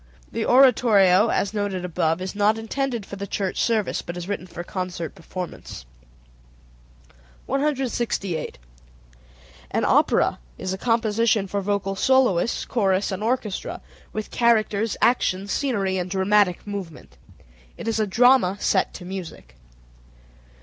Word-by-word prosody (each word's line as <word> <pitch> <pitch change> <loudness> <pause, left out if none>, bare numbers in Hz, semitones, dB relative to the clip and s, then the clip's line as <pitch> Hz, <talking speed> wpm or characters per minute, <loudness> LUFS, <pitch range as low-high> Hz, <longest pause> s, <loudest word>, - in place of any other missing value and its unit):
The 225 - -2
oratorio, 220 -6 +5
as 200 -2 0
noted 200 -3 -2
above, 165 0 0
is 185 - -5
not 210 +1 +2
intended 235 0 -3
for 200 - -8
the 200 +1 -5
church 195 -1 -2
service, 220 -4 0
but 175 +1 -7
is 175 0 -6
written 200 -2 -4
for 175 0 -7
concert 180 -3 -5
performance. 175 - -8 1.6
168. 250 - -2 1.1
An - - 0
opera - - +3 0.2
is 185 - -3
a 190 - -5
composition 230 -2 +1
for 200 +1 -3
vocal 195 0 -1
soloists, 245 -4 +2
chorus, 195 -3 +1
and 190 +1 -4
orchestra, 220 -3 -2 0.3
with 215 0 -5
characters, 220 -2 +1
action, 200 -5 +2
scenery, 200 -7 -1
and 180 0 -3
dramatic 190 -1 +2
movement. 200 -6 -8 0.6
It - - -7
is 225 -1 0
a 215 - +1
drama 235 -2 +4
set - - +1
to 180 - -9
music. 175 - -8
200 Hz, 130 wpm, -23 LUFS, 185-230 Hz, 1.6 s, oratorio